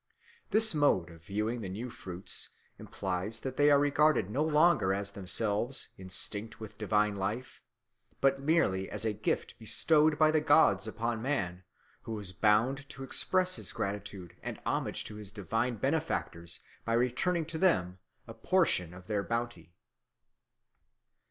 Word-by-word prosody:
This 220 -1 +6
mode 120 - +2
of 80 -1 -15
viewing 105 +6 -2
the 95 - -5
new 115 +6 -5
fruits 95 -5 -4 0.3
implies 95 +4 -4
that 130 -1 -5
they 145 +1 +4
are 145 - +6
regarded 145 -7 +2
no 140 +7 +1
longer 155 - +3
as 100 0 -3
themselves 105 +6 0
instinct 100 +3 -3
with 110 -2 -10
divine 105 -1 +1
life, 110 +6 -4 0.6
but 135 0 +2
merely 140 - +1
as - - -1
a 110 - +1
gift 105 - -3
bestowed 155 -1 +3
by 155 0 +5
the 155 -1 +2
gods 150 -5 +4
upon 115 +1 -3
man, 95 -10 -2 0.4
who 110 -1 -5
is 100 -3 -4
bound 120 +8 +2
to 135 - -8
express 185 +7 +1
his - - -4
gratitude 100 -3 -5
and - - -6
homage - - -1
to 105 - -8
his 105 -2 -8
divine 115 +4 -2
benefactors 105 - -2 0.2
by 115 - -1
returning 130 +9 +1
to 160 0 -5
them 95 - +2 0.3
a 115 - -9
portion 110 - +1
of 90 0 -12
their 105 0 -1
bounty. 115 -6 -4
115 Hz, 150 wpm, -31 LUFS, 100-145 Hz, 0.6 s, This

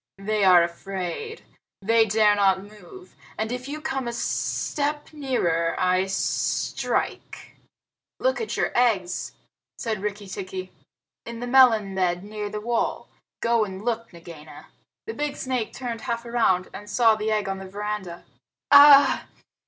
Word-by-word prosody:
They 210 +1 -1
are 180 -2 +7
afraid. 190 - -5 0.4
They 225 +2 +4
dare 210 0 +4
not 195 -2 +2
move, 215 - -14 0.2
and 220 +1 -2
if 250 +1 -5
you 300 +2 -5
come 270 -5 -3
a 235 - -3
step 295 +5 -2
nearer 175 - 0
I 185 +1 +2
strike." 195 - -2 0.6
"Look - - 0
at 450 - -4
your - - 0
eggs," 200 -8 0 0.4
said 220 -4 -3
Rikki 205 0 -4
tikki, 185 -1 -7 0.6
"in 235 0 -7
the 245 - -4
melon 240 -6 +4
bed 180 -1 0
near 210 0 -5
the 210 - -5
wall. 235 +2 -2 0.3
Go 235 -1 +3
and 190 -2 -6
look, 230 -1 -2
Nagaina!" 165 -3 -13 0.4
The 450 - -5
big 295 -5 -3
snake 255 -4 -2
turned 240 -3 -6
half 235 +1 -4
around, 225 -6 +1
and 205 +1 -9
saw 230 -3 +4
the 215 0 -2
egg 210 -2 0
on 195 0 -3
the 190 - -8
veranda. 205 -3 -5 0.5
"Ah 285 0 +8
h! - - -32
215 Hz, 150 wpm, -24 LUFS, 190-245 Hz, 0.6 s, Ah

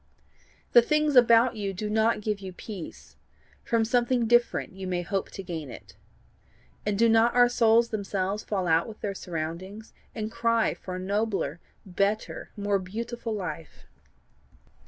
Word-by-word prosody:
The 240 - +8
things 300 +3 +1
about 235 0 +6
you 200 -2 -3
do 210 +3 -4
not 220 +1 +1
give 210 -1 -2
you 190 -1 -7
peace; 190 -2 -9 0.5
from 230 -1 +1
something 245 0 +1
different 240 -2 +2
you 190 0 -7
may 180 -1 -1
hope 195 +2 -2
to 195 - -8
gain 160 -6 -6
it. 100 -5 -12 0.9
And 205 -1 0
do 230 +2 +4
not 225 +1 +4
our 245 0 +7
souls 235 -1 +3
themselves 200 -1 -2
fall 195 -3 -2
out 165 0 +2
with 220 -2 -11
their 200 - -2
surroundings, 180 +5 -6 0.2
and 215 -1 -4
cry 230 -1 +1
for 185 - -7
a - - -4
nobler, 200 -3 -1 0.3
better, 200 +3 -2
more 205 -1 0
beautiful 225 +4 -5
life? 165 -5 -7
210 Hz, 155 wpm, -27 LUFS, 185-230 Hz, 0.9 s, The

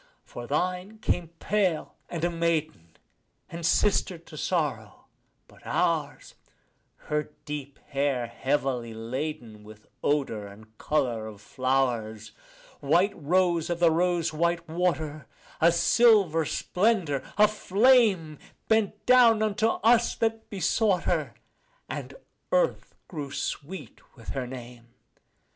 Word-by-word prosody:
For - - -9
thine 185 +4 -2
came 175 -5 -1
pale 190 -6 0 0.2
and 170 -2 -5
a 175 - +1
maiden, 160 - -2 0.5
and 170 0 -7
sister 185 +1 +2
to 165 -1 -15
sorrow; 145 - -2 0.4
but - - -20
ours, - - -1 0.6
Her 150 0 -3 0.2
deep 145 -2 -6
hair 140 -3 0
heavily 125 -1 -2
laden 115 -2 -5
with 105 0 -14 0.2
odour 135 -8 0
and 110 +2 -15
colour 120 -7 -1
of 105 -2 -10
flowers, 120 -3 -1 0.5
White 175 +8 +2
rose 170 +1 +1
of 170 -1 -2
the 170 -2 +5
rose 175 -1 +1
white 170 +1 0
water, 160 -3 -2 0.3
a 170 +1 +6
silver 180 -3 +4
splendour, 180 - 0 0.2
a 210 0 +7
flame, 210 - +3 0.3
Bent 215 -2 +1
down 235 -3 +6
unto 215 +1 +1
us 235 +1 +3
that 225 0 -2
besought 200 -1 +1
her, - - -1 0.5
and - - -6 0.4
earth - - 0
grew 150 -5 -6
sweet 160 +6 -6 0.2
with 115 - -11
her 130 -2 -3
name. 120 -2 -10
160 Hz, 115 wpm, -27 LUFS, 130-190 Hz, 0.6 s, a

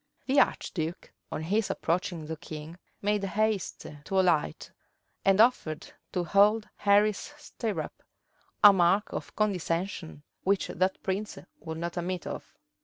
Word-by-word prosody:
The 275 +1 +4
archduke, 165 - -1 0.2
on 155 - -3
his 205 +5 +1
approaching 170 -1 -1
the 160 +1 -4
king, 160 +1 -9 0.2
made 205 0 +1
haste 210 0 -1 0.2
to 195 - +1
alight, 170 - +1 0.5
and 195 +1 +4
offered 220 -10 +2 0.2
to 180 - 0
hold 205 +5 +4
Henry's 210 +6 +2
stirrup; 235 -8 -5 0.6
a 205 -1 +11
mark 190 +3 +3
of - - -6
condescension 180 -5 -2 0.2
which 195 0 +1
that 185 +1 0
prince 200 +2 -2 0.2
would 160 -1 -6
not 170 +1 -4
admit 180 0 -2
of. - - -6
190 Hz, 130 wpm, -29 LUFS, 170-210 Hz, 0.6 s, a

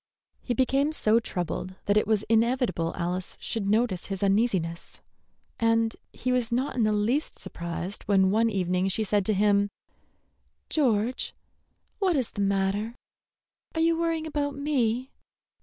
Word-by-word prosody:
He 245 - -2
became 270 +5 +2
so 225 -6 +3
troubled 185 -3 -4
that 205 - +2
it 210 - +3
was 215 -2 +2
inevitable 230 -6 +1
Alice 180 +2 -3
should 210 -4 -2
notice 215 -4 +1
his 195 -1 -3
uneasiness, 195 -5 0 0.6
and 225 0 +2 0.2
he 255 - -2
was 250 -2 +1
not 255 +4 0
in 245 - +1
the 215 - +2
least 220 +8 0
surprised 170 +3 -6
when 190 -2 +4
one 225 +2 +3
evening 185 -2 0
she 195 +3 0
said 205 -1 +1
to 215 - +3
him: 205 0 +3 1.0
"George, 245 -4 +1 0.6
what 375 -4 +2
is 260 -5 0
the 205 - -4
matter? 200 +3 0 0.8
Are 320 - +1
you 330 0 +4
worrying 330 -1 -1
about 290 -2 -2
me?" 260 -3 0
220 Hz, 145 wpm, -27 LUFS, 195-255 Hz, 1.0 s, when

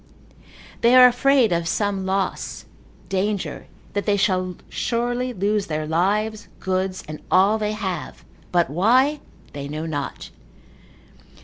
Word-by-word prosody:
They 235 +2 +5
are 255 0 +10
afraid 250 -2 +4
of 170 -1 0
some 195 0 -1
loss, 190 0 -2 0.4
danger, 195 +1 -2 0.3
that 205 +1 -2
they 205 -1 +3
shall 185 -2 0
surely 245 +1 -1
lose 205 -1 0
their 155 -1 -2
lives, 205 +6 0
goods, 185 0 -2
and 155 0 -7
all 200 +4 +4
they 210 0 -1
have, 195 -4 -5 0.3
but 175 -1 +3
why 255 - +3 0.3
they 140 -1 -5
know 155 +2 -4
not. 145 -4 -5
195 Hz, 125 wpm, -22 LUFS, 180-220 Hz, 0.4 s, are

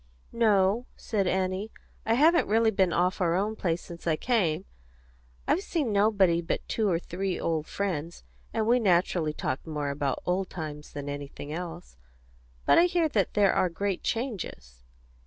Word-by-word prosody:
"No," 215 0 +3
said 200 -5 -1
Annie; 190 +3 -1 0.4
"I 225 - +3
haven't 320 +6 +4
really 225 +1 +3
been 190 -3 +2
off 180 +3 +1
our 170 -1 +2
own 210 +4 0
place 170 -4 -1
since 170 0 -9
I 160 - +3
came. 185 -5 0 0.8
I've 355 - +2
seen 310 - -1
nobody 200 -5 +3
but 165 - -3
two 215 -3 0
or 170 - +2
three 185 +2 -3
old 160 -2 -1
friends, 170 -5 -3 0.3
and 220 -1 0
we 240 +2 +4
naturally 175 -5 +2
talked 135 -1 -4
more 150 -2 -2
about 140 -1 -2
old 185 +1 0
times 150 -3 -7
than 145 -1 -6
anything 145 +1 -6
else. 165 - -7 0.7
But - - +6
I 340 - +6
hear 345 -3 +1
that 205 -9 0
there 205 -2 +4
are 185 - +2
great 195 +2 -2
changes." 160 - -4
185 Hz, 165 wpm, -28 LUFS, 160-215 Hz, 0.8 s, But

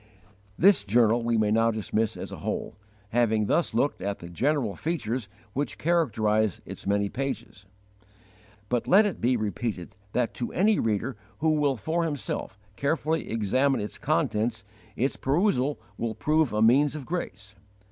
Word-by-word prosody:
This 195 - +5
journal 115 +2 +3
we 115 0 +1
may 105 -1 +2
now 115 +1 +4
dismiss 110 0 -1
as - - -6
a - - -6
whole, - - -4 0.3
having 110 -2 +2
thus 145 +1 +1
looked 140 +5 +1
at 100 +1 -2
the 85 - -10
general 125 - 0
features 125 -9 -3 0.2
which 145 +2 -2
characterize 110 - +1
its - - -7
many 100 0 +2
pages. 115 -5 -5 1.0
But 120 +2 -1
let 205 +4 +6
it 205 - -3
be 125 +1 +2
repeated 105 -3 -3 0.2
that 125 -2 0
to 120 - -4
any 210 +4 +3
reader 110 +3 -1 0.2
who 160 +1 +2
will 145 -3 +2
for 160 +9 -1
himself 140 -10 -3 0.2
carefully 155 +4 -1
examine 130 +6 +1
its 105 - -5
contents 120 -7 0 0.3
its 135 +4 0
perusal 145 -2 +1 0.2
will 115 -1 -2
prove 155 +4 +2
a 105 +1 +2
means 140 +6 +4
of 145 -4 -6
grace. 110 - -5
120 Hz, 155 wpm, -27 LUFS, 110-150 Hz, 1.0 s, let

